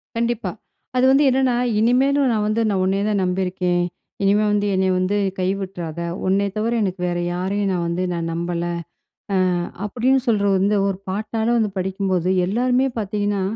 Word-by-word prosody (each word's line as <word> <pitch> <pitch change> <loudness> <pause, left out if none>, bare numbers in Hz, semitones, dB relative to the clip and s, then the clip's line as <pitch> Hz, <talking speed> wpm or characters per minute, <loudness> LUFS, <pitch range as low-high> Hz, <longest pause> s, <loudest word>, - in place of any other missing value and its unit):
கண்டிப்பா. 235 0 -1 0.4
அது 255 +1 +3
வந்து 275 +2 +5
என்னன்னா 260 -1 +2 0.2
"இனிமேலும் 265 +4 +3
நான் 215 -2 0
வந்து, 215 +2 +1
நான் 195 -2 +1
உன்னையே 195 +2 +1
தான் 205 -2 +1
நம்பியிருக்கேன். 180 -1 0 0.4
இனிமே 205 +2 +3
வந்து, 205 0 +1
என்னைய 190 0 +2
வந்து, 185 +3 0 0.2
கைவிட்டுறாத 185 -3 -3 0.3
உன்னைய 200 +1 +2
தவிர 225 +2 0
எனக்கு 185 -1 -3
வேற 175 0 -1 0.2
யாரையும் 195 +2 -1
நான் 175 -2 -1
வந்து 175 +2 -1
நான் 165 -1 -3
நம்பல" 170 0 -2 1.0
ஆ, - - -1 0.3
அப்படின்னு 255 +5 +2
சொல்ற 205 -3 +2
வந்து 205 +2 +2
ஒரு 195 -2 -2
பாட்டால 220 +3 -2
வந்து 215 -2 +1
படிக்கும்போது 185 -1 -1 0.2
எல்லாருமே 250 +6 +2
பார்த்தீங்கன்னா, 205 -1 -1
200 Hz, 155 wpm, -21 LUFS, 185-225 Hz, 1.0 s, வந்து